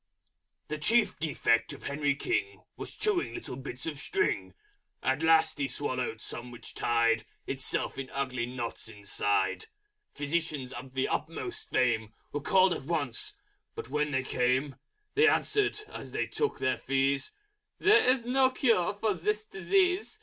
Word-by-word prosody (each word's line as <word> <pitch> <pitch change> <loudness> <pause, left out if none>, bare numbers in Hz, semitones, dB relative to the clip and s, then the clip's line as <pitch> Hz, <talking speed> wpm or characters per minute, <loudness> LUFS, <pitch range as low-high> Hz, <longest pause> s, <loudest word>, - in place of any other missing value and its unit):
_ - - -46
The 150 0 -4
Chief 220 +6 +3
Defect 145 -7 +1
of - - -11
Henry 140 0 0
King 360 - -2
Was - - -6
chewing 415 -5 0
little 350 - -5
bits 130 0 -6
of 155 -4 -3
String. 405 - 0 0.5
At 135 +3 +1
last 160 -1 +4
he 140 - +1
swallowed 130 -4 -2
some 120 +1 -4
which 120 -1 -8
tied 115 -1 +2 0.2
Itself 135 0 -2
in 135 -1 -5
ugly 130 -3 -2
Knots 120 -2 -4
inside. 105 - 0 0.5
Physicians 145 -3 -1
of 130 +1 -9
the 130 - +1
Utmost 365 - -3
Fame 115 -4 +1 0.2
Were 145 - -3
called 190 +4 +4
at - - -6
once; 145 -7 -2 0.4
but - - -6
when 150 +2 0
they 130 -2 0
came 130 +2 +1 0.4
They 435 +1 +5
answered, 420 -1 +2
as - - -9
they - - 0
took 445 - -1
their 130 -2 +1
Fees, 135 - 0 0.5
"There 425 +1 +6
is 255 -2 +3
no 260 +1 +4
Cure 230 -8 +2
for 210 0 +1
this 210 +4 -1
Disease. 365 - +1
145 Hz, 155 wpm, -30 LUFS, 130-215 Hz, 0.5 s, There